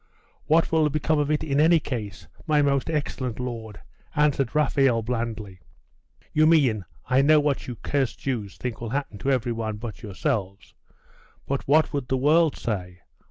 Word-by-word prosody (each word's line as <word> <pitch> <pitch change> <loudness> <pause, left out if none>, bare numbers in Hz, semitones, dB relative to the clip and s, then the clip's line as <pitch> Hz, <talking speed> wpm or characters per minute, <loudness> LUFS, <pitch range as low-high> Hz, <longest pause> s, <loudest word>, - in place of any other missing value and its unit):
'What 165 +2 +3
will 160 -2 +3
become 155 +1 0
of 145 0 0
it 155 0 +1
in 140 -2 0
any 165 +2 +5
case, 110 -8 -6 0.2
my 150 -2 +3
most 140 0 +1
excellent 135 -6 -3
lord?' 115 -5 -6 0.4
answered 145 -4 +1
Raphael 135 -5 +2
blandly. 110 -5 -4 0.7
'You 155 0 +4
mean 130 - +3 0.2
I 130 +1 +4
know 150 +2 +5
what 145 -2 -1
you 125 - -5
cursed 135 +2 -1
Jews 115 -8 -4
think 125 -3 -5
will 115 - -4
happen 135 -5 -3
to 135 - -2
every 125 -3 +1
one 110 -2 -3
but 110 0 -7
yourselves. 100 -1 -3 0.7
But 140 0 -3
what 155 +2 +3
would 140 -3 -2
the 130 - 0
world 155 +3 +3
say? 90 -5 -4
130 Hz, 165 wpm, -25 LUFS, 115-150 Hz, 0.7 s, any